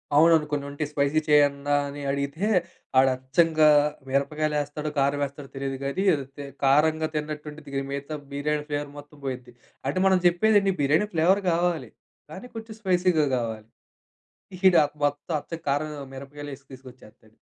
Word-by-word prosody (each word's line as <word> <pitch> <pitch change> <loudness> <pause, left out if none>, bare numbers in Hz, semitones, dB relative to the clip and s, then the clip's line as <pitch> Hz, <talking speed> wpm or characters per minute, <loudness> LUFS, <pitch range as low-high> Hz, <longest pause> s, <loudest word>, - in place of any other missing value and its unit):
అవునవును, 160 0 +6
కొన్నుంటయి. 145 +1 -3
స్పైసీ 145 +1 +1
చేయండ్రా 145 -1 +3
అని 145 +1 -7
అడిగితే 140 +7 -2 0.5
ఆడచ్చంగా, 135 +5 +3 0.4
మిరపకాయలేస్తాడో, 150 +2 -1
కారమేస్తాడో 140 0 -1
తెలీదు 135 0 -3
గానీ, 140 +8 -1
ఏదో 140 - -1
తే 145 - -6 0.2
కారంగా 155 +3 +3
తిన్నట్టుండిద్ది 150 -1 -5
గానీ, 135 0 -1
మిగతా 140 +2 -4
బిర్యానీ 150 +1 -1
ఫ్లేవర్ 145 -1 -3
మొత్తం 145 0 -13
పోయిద్ది. 125 -2 -5 0.3
అంటే, 140 - -1
మనం 190 -1 +4
చెప్పేదేండి, 195 +2 +3
బిర్యానీ 155 +9 +2
ఫ్లేవర్ 180 +5 +3
గావాలి, 170 -1 0 0.4
కానీ 190 +9 -8
కొంచెం 225 -1 -8
స్పైసీగా 180 -4 +2
గావాలి. 110 -2 -4 1.0
ఈడా 170 -4 +6 0.2
మొత్తం 145 +3 -2
అచ్చం 165 +2 -7
కారం, 145 +2 0 0.2
మిరపకాయలేసి 140 0 -9
తీసుకొచ్చేత్తాడు. 125 -4 -15
145 Hz, 125 wpm, -25 LUFS, 140-160 Hz, 1.0 s, అవునవును